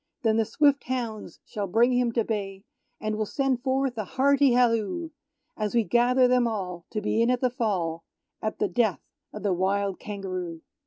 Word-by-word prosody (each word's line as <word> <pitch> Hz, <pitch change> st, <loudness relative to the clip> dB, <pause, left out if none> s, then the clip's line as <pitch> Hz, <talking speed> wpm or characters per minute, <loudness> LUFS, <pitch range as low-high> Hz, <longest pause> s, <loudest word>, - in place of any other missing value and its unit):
Then 220 Hz, -1 st, +3 dB
the 225 Hz, -, +2 dB
swift 285 Hz, +3 st, +2 dB
hounds 235 Hz, -4 st, -4 dB
shall 205 Hz, -2 st, -4 dB
bring 235 Hz, +7 st, +3 dB
him 245 Hz, -1 st, +2 dB
to 230 Hz, -, +2 dB
bay, 195 Hz, -3 st, -4 dB, 0.4 s
And 215 Hz, 0 st, -2 dB
we'll 215 Hz, -1 st, -1 dB
send 270 Hz, -1 st, 0 dB
forth 265 Hz, -1 st, 0 dB
a -, -, 0 dB
hearty 275 Hz, +4 st, +3 dB
halloo, 240 Hz, -, +1 dB, 0.4 s
As 215 Hz, +1 st, -2 dB
we 235 Hz, -, +4 dB
gather 245 Hz, +3 st, +3 dB
them 250 Hz, -1 st, +3 dB
all 180 Hz, -6 st, -4 dB
to 215 Hz, -, -3 dB
be 225 Hz, -, +1 dB
in 230 Hz, -, +3 dB
at 250 Hz, 0 st, +2 dB
the 255 Hz, -1 st, +1 dB
fall 185 Hz, -10 st, -1 dB, 0.4 s
At 215 Hz, -, -3 dB
the -, -, +1 dB
death 225 Hz, -6 st, +1 dB, 0.3 s
of -, -, -8 dB
the 200 Hz, -3 st, +2 dB
wild 195 Hz, +1 st, 0 dB
Kangaroo! 185 Hz, -5 st, -5 dB
225 Hz, 190 wpm, -26 LUFS, 200-250 Hz, 0.4 s, we